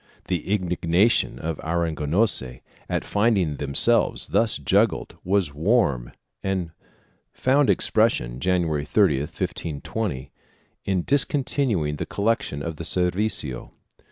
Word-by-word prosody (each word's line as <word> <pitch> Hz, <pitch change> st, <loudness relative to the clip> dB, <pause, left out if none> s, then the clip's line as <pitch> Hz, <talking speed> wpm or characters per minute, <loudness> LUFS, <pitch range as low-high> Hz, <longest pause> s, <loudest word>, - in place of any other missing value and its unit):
The 90 Hz, +1 st, -2 dB
indignation 90 Hz, +2 st, +2 dB
of 80 Hz, -1 st, -4 dB
the 80 Hz, -, -8 dB
Aragonese 80 Hz, -, 0 dB, 0.3 s
at -, -, -1 dB
finding 100 Hz, -8 st, +1 dB
themselves 70 Hz, -1 st, +2 dB
thus 115 Hz, -1 st, +2 dB
juggled 70 Hz, -, +1 dB
was 95 Hz, -5 st, 0 dB
warm 75 Hz, -, +1 dB, 0.3 s
and 95 Hz, -4 st, -2 dB, 0.6 s
found 135 Hz, +2 st, +2 dB
expression, 85 Hz, -, +1 dB
Jan 90 Hz, +4 st, +1 dB
uary 75 Hz, -3 st, -2 dB
30, 90 Hz, -10 st, +3 dB
1520, 75 Hz, -, -4 dB, 0.5 s
in 95 Hz, -3 st, 0 dB
discontinuing 130 Hz, -, +1 dB
the -, -, -4 dB
collection 105 Hz, -, -1 dB
of 80 Hz, -1 st, -5 dB
the 85 Hz, -, -6 dB
servicio. 90 Hz, -, -1 dB
85 Hz, 110 wpm, -24 LUFS, 75-105 Hz, 0.6 s, 30